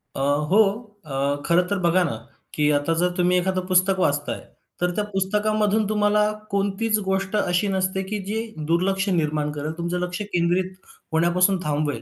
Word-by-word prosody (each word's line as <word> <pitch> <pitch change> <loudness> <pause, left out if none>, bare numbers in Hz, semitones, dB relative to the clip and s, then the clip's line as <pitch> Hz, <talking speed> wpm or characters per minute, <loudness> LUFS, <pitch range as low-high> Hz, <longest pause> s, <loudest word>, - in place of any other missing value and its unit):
अ, - - -4 0.3
हो 210 +4 +6 0.4
अ, 140 0 -1
खरं 170 +1 +3
तर 200 -1 -1
बघा 175 +1 +3
ना, 165 - -2 0.4
की 150 -1 +2
आता 145 +3 +1
जर 180 - +3
तुम्ही 180 0 +3
एखादं 185 0 -1
पुस्तक 185 +1 +3
वाचताय, 145 -4 0 0.4
तर 180 0 +2
त्या 210 - 0
पुस्तकामधून 210 +2 0
तुम्हाला 210 0 +2 0.3
कोणतीच 200 +2 +1
गोष्ट 190 +1 -1
अशी 190 -1 +1
नसते, 190 0 0
की 205 +2 -4
जे 220 - -1 0.3
दुर्लक्ष 195 +3 +1
निर्माण 155 -4 0
करेल, 150 +2 -3
तुमचं 170 +1 -2
लक्ष 180 +1 -3
केंद्रित 175 +2 +1 0.4
होण्यापासून 180 +3 +3
थांबवेल. 150 -1 -1
185 Hz, 160 wpm, -23 LUFS, 170-200 Hz, 0.4 s, हो